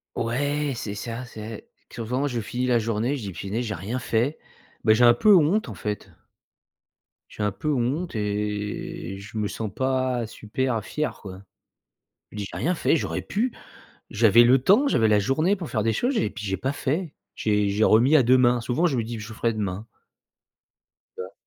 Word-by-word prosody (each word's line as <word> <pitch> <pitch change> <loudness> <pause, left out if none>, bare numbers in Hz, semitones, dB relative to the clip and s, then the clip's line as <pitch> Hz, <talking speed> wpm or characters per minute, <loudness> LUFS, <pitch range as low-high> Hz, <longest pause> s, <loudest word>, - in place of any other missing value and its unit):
Ouais, 145 +4 -1
c'est 105 -3 -5
ça, 115 +4 -5
c'est 110 -2 -9 0.2
qu'autrement 125 +5 -2
je 120 -4 -2
finis 125 +3 -3
la 120 - +3
journée, 115 +4 -1
je - - -7
dis: 100 - -5
«Punaise 100 +8 -3
j'ai 105 - -3
rien 105 +9 -4
fait» 120 +5 0 0.5
bah 110 - +5
j'ai 120 +2 +5
un 120 - +8
peu 210 -2 +6
honte, 170 +1 +3
en 110 - -6
fait. 105 +3 -5 1.2
J'ai 105 - -5
un 105 - +1
peu 150 +10 -2
honte 135 +6 -1
et 105 -3 -3
je 105 +3 -9
me 105 -1 0
sens 110 -1 -5
pas 130 -2 0
super 115 +1 -2
fier, 150 +10 -3
quoi. 95 -1 -9 0.9
Je - - -12
dis: 100 - -3
«J'ai - - -6
rien 180 +3 +1
fait, 165 - +2
j'aurais - - -2
pu, 235 +4 -1 0.6
j'avais 115 +2 +5
le 125 +3 +6
temps, 235 - +4
j'avais 110 - +3
la 105 -1 +4
journée 155 - +1
pour 170 -4 -7
faire 110 -4 0
des 115 +1 +1
choses 250 - 0
et - - 0
puis 110 - -8
j'ai 95 -1 -1
pas 135 +8 -2
fait», 150 +4 -2 0.2
j'ai 105 -1 +1
j'ai 105 +2 +2
remis 125 +8 +5
à 135 - +5
demain, 125 0 +4
souvent 125 +9 0
je 140 - 0
me 115 - 0
dis: 115 0 -5
«Je 110 +2 -8
ferai 115 +1 0
demain». 105 0 -4 1.3
Tu - - -5
vois? 95 +1 -8
115 Hz, 195 wpm, -25 LUFS, 105-135 Hz, 1.3 s, un